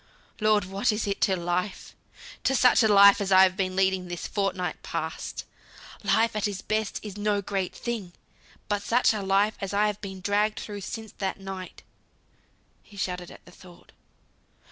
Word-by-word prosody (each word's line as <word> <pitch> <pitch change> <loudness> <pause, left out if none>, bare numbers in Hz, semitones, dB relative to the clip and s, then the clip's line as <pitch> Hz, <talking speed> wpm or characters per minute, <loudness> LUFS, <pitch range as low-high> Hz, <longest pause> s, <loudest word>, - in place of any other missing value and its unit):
Lord, 215 -2 +3
what 195 +3 0
is 210 +1 -2
it 200 -1 -3
to 190 - +3
Life? 175 +3 -3 0.5
To 270 - +3
such 250 -1 +5
a 220 - +4
life 200 -1 +7
as 195 -1 -2
I've 185 0 +6
been 185 -1 -2
leading 190 -1 +1
this 175 -1 -5
fortnight 195 -3 -2
past. - - -5 0.6
Life 225 0 +2
at 210 -1 0 0.2
best 215 -1 -1
is 205 -1 -7
no 205 0 +1
great 195 -2 -3
thing; 225 -7 -5 0.5
but 205 0 -1
such 235 +2 +3
a 210 - -3
life 195 +2 +2
as 195 0 -3
I 210 +1 +3
have 210 -1 -2 0.2
dragged 210 +2 +1
through 205 -1 -7
since 220 +3 -7
that 195 0 -2
night," 190 -1 -8 1.0
he 205 - -17
shuddered 180 -2 -3
at - - -15
the - - -15
thought. 180 -1 -17
200 Hz, 165 wpm, -26 LUFS, 190-210 Hz, 1.0 s, life